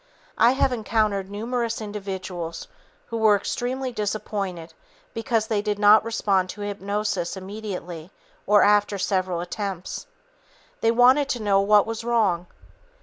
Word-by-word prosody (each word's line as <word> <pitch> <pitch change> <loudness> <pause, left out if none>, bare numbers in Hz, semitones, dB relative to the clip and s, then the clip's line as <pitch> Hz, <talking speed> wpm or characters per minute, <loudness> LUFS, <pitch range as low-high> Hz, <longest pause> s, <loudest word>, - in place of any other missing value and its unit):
I 240 - +6
have 265 -1 +1
encountered 215 -4 0
numerous 230 +3 -2
individuals 190 - -6 0.4
who 230 - -3
were 220 -2 +5
extremely 255 +5 -3
disappointed 200 -6 -4 0.4
because 225 -1 0
they 220 -2 0
did 210 -1 -2
not 210 +1 +6
respond 200 -5 0
to 205 - -8
hypnosis 200 -2 -2
immediately 190 -4 -7 0.4
or 205 +1 +6
after 205 0 +3
several 185 -3 -1
attempts. 190 - -5 0.7
They 225 - +2
wanted 255 +4 +5
to 240 -4 -2
know 200 -1 +3
"what 205 0 +5
was 225 0 -5
wrong." 210 -7 +1
205 Hz, 130 wpm, -24 LUFS, 190-225 Hz, 0.7 s, I